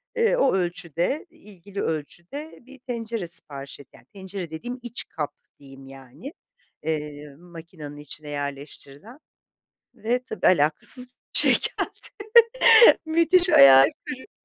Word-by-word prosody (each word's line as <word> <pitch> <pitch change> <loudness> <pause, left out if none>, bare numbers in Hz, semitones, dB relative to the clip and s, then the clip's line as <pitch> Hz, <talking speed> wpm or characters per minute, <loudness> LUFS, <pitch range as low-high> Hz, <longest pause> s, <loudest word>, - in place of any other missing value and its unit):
eee, 465 +1 +2
o 270 - +2
ölçüde, 175 - -2
ilgili 200 - -10
ölçüde 175 - -6
bir 270 0 -15
tencere 230 -6 -5
sipariş 145 -5 -8
et 140 - -14
Yani, 115 - -19
tencere 190 -3 -8
dediğim 245 +10 -7
iç 240 0 -6
kap 150 -3 -5 0.3
diyeyim 135 -1 -15
yani, 135 - -12 0.5
eee, 150 -2 -5
makinenin 165 -3 -12
içine 150 +1 -11
yerleştirilen 145 - -8 0.8
ve 245 +3 -2
tabii - - -2
alakasız 165 - +3
bir - - -39 0.3
şey - - +5
geldi. - - -4 1.0
Müthiş 335 +3 +3
hayal 135 - +8 0.2
kırıklığı. 285 +4 -9
175 Hz, 120 wpm, -23 LUFS, -, 1.0 s, hayal